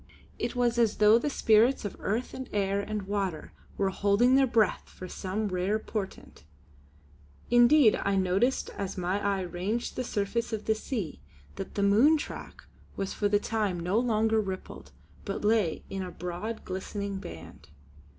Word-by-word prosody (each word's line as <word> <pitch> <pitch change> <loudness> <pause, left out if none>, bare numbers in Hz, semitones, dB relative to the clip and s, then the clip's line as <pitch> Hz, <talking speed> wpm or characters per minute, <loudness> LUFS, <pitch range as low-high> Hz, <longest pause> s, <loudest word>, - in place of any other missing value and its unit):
It 235 - -2
was 240 -1 +1
as 230 -3 +3
though 215 +2 +6
the 295 - -1
spirits 230 -1 +3
of 205 - -4
earth 225 +5 -2
and 260 -1 -7
air 200 -1 0
and 210 0 -4
water 190 -5 -3 0.3
were 195 -1 +1
holding 205 +6 +3
their 270 0 +5
breath 225 -4 +1
for 185 - -9
some 200 +4 -3
rare 185 +3 0
portent. 215 -2 -6 1.1
Indeed 240 0 +6
I 200 0 +1
noticed 195 +7 +1
as 195 -1 -5
my 185 +3 -1
eye 200 -1 +1
ranged 185 +6 -3
the 255 - -2
surface 230 +1 -2
of 215 -1 -3
the 220 - +3
sea, 215 - -5 0.3
that - - -7
the 200 - 0
moon 230 +11 +5
track - - -8 0.3
was 195 - -3
for 205 - 0
the 205 - +4
time 210 -5 -1
no 180 +6 +1
longer 225 -2 +2
rippled, 190 -2 -7 0.3
but 200 +1 -4
lay 210 -7 +2
in 195 0 -4
a 185 - -4
broad 180 +6 -5
glistening 195 +1 -4
band. 85 - -11
205 Hz, 165 wpm, -28 LUFS, 190-230 Hz, 1.1 s, though